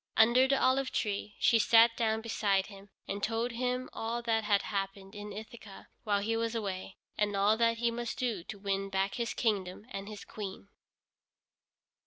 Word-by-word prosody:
Under 240 +4 +6
the 275 0 +2
olive 260 +1 +2
tree 205 -1 -2
she 230 - +4
sat 230 +1 +6
down 220 -1 0
beside 200 -4 +1
him, 200 -1 -13 0.2
and 200 +1 -4
told 230 +3 0
him 250 +2 -1
all 235 +1 -3
that 225 -2 +1
had 205 -1 +3
happened 195 -1 -4
in 205 0 -7
Ithaca 220 -1 -10 0.2
while 205 -2 +2
he 225 +3 0
was 230 0 -1
away, 195 -3 -4 0.2
and 205 -1 +1
all 200 +2 +4
that 230 0 +3
he 235 0 +1
must 240 0 -4
do 230 -8 -1
to 215 - -7
win 195 0 -2
back 195 0 0
his 235 -1 -2
kingdom 200 -3 -1
and 195 -2 -5
his 210 -1 -8
Queen. 200 -1 -7
215 Hz, 180 wpm, -31 LUFS, 200-230 Hz, 0.2 s, Under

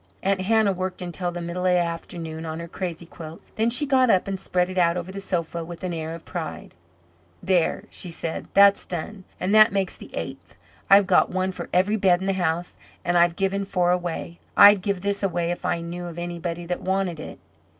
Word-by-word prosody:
Aunt 195 -1 +1
Hannah 215 0 +3
worked 185 0 -4
until 175 0 -3
the 175 0 -5
middle 180 +2 -2
of 180 - +4
the - - +4
afternoon 165 -1 -4
on 160 0 -5
her 170 - -6
crazy 170 -1 -5
quilt. 165 -1 -10 0.2
Then 225 +1 +2
she 275 +5 +1
got 260 -3 +3
up 190 -3 +3
and 195 -1 -3
spread 180 0 0
it 185 0 -2
out 170 0 +3
over 180 +1 -5
the 195 - -6
sofa 170 -3 -2
with 170 +2 -9
an 180 -1 -2
air 160 0 -4
of 165 - -12
pride. 165 -3 -6 0.7
"There," 180 -3 +1
said 175 -2 -7 0.3
she, - - -19
"that's 200 0 +6
done, 185 +3 -5
and 185 +3 0
that 215 0 +7
makes 195 -2 -1
the - - -12
eighth. - - -7 0.3
I've 195 0 +7
got 185 -1 +4
one 185 +1 -1
for - - -7
every 195 +4 +2
bed 185 -3 +4
in 190 - -4
the 195 - +1
house, 175 -1 -2 0.3
and 175 - +1
I've 170 -1 +4
given 195 +1 0
four 180 -2 +1
away. 175 -1 -3 0.2
I'd 205 -1 +9
give 200 -1 -2
this 200 0 -1
away 175 -3 0
if 175 - -4
I 170 - 0
knew 175 +1 -6
of 170 -1 -8
anybody 175 0 -4
that 180 +1 -3
wanted 190 -3 -1
it." - - -8
180 Hz, 220 wpm, -24 LUFS, 170-195 Hz, 0.7 s, I'd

